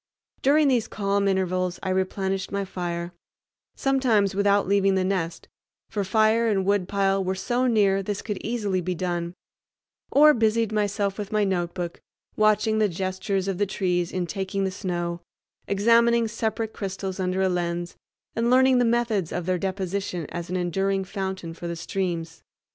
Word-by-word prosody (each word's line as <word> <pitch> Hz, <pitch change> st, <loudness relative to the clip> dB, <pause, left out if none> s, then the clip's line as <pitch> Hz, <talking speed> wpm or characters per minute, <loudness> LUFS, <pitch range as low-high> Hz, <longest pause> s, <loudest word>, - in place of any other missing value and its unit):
During 295 Hz, +2 st, +4 dB
these 245 Hz, -5 st, +2 dB
calm 200 Hz, -1 st, 0 dB
intervals 185 Hz, -2 st, 0 dB
I -, -, -2 dB
replenished 190 Hz, +1 st, -1 dB
my 200 Hz, 0 st, -1 dB
fire—sometimes 190 Hz, +6 st, -2 dB
without 200 Hz, 0 st, +2 dB
leaving 195 Hz, 0 st, +3 dB
the 190 Hz, -, +2 dB
nest, 180 Hz, -3 st, -2 dB, 0.4 s
for 205 Hz, -, -1 dB
fire 220 Hz, +3 st, +3 dB
and 195 Hz, -4 st, +1 dB
woodpile 195 Hz, 0 st, +1 dB
were 190 Hz, +1 st, -1 dB
so 245 Hz, +6 st, 0 dB
near 200 Hz, -4 st, +3 dB
this 200 Hz, +1 st, -4 dB
could 210 Hz, -3 st, -4 dB
easily 210 Hz, -5 st, -1 dB
be 180 Hz, +1 st, -2 dB
done—or 180 Hz, -, 0 dB
busied 225 Hz, -2 st, +1 dB
myself 205 Hz, -1 st, -1 dB
with 205 Hz, 0 st, -5 dB
my 215 Hz, -1 st, +2 dB
notebook, 175 Hz, -2 st, -2 dB, 0.3 s
watching 215 Hz, +1 st, +3 dB
the 210 Hz, -1 st, +3 dB
gestures 190 Hz, +2 st, -2 dB
of 195 Hz, -1 st, -2 dB
the 205 Hz, -, +2 dB
trees 180 Hz, -3 st, -1 dB
in 185 Hz, -1 st, -1 dB
taking 195 Hz, +2 st, -3 dB
the 190 Hz, -, 0 dB
snow, 175 Hz, -3 st, -3 dB, 0.5 s
examining 230 Hz, +3 st, +4 dB
separate 220 Hz, 0 st, -2 dB
crystals 190 Hz, -1 st, -4 dB
under 185 Hz, 0 st, -1 dB
a -, -, +3 dB
lens, 175 Hz, -1 st, -2 dB, 0.4 s
and 230 Hz, +1 st, +1 dB
learning 260 Hz, 0 st, +5 dB
the 245 Hz, -, +3 dB
methods 230 Hz, -7 st, +1 dB
of 175 Hz, -1 st, -3 dB
their 185 Hz, 0 st, 0 dB
deposition 190 Hz, -2 st, -3 dB
as 175 Hz, -1 st, -5 dB
an 185 Hz, -, -1 dB
enduring 195 Hz, +2 st, 0 dB
fountain 190 Hz, -3 st, -4 dB
for 170 Hz, +1 st, -7 dB
the 170 Hz, -, -3 dB
streams. 170 Hz, -1 st, -3 dB
195 Hz, 155 wpm, -25 LUFS, 180-215 Hz, 0.5 s, learning